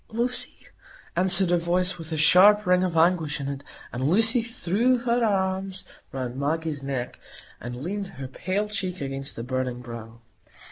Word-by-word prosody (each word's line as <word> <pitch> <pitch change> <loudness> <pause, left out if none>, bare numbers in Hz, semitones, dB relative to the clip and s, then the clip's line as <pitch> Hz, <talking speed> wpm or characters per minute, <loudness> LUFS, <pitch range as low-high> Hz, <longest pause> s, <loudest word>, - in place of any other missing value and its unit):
"Lucy!" 240 +3 +1 0.6
answered 185 0 +5
a 175 - +3
voice 180 +2 -1
with 165 0 -8
a 160 - -2
sharp 195 +7 +6
ring 180 0 +3
of 175 -3 -1
anguish 160 -3 +2
in 140 - -4
it; 140 0 -5 0.3
and 130 +4 -1
Lucy 225 +6 +4
threw 235 +1 +1
her 240 0 0
arms 190 -2 -1 0.3
round 130 -2 -4
Maggie's 150 +1 -2
neck, 135 -3 -4 0.4
and 120 0 -6
leaned 190 +10 -4
her 130 -6 -8
pale 190 +10 -2
cheek 190 -3 -4
against 135 0 -5
the 115 - -6
burning 130 0 -3
brow. 115 -1 -9
175 Hz, 160 wpm, -25 LUFS, 135-195 Hz, 0.6 s, sharp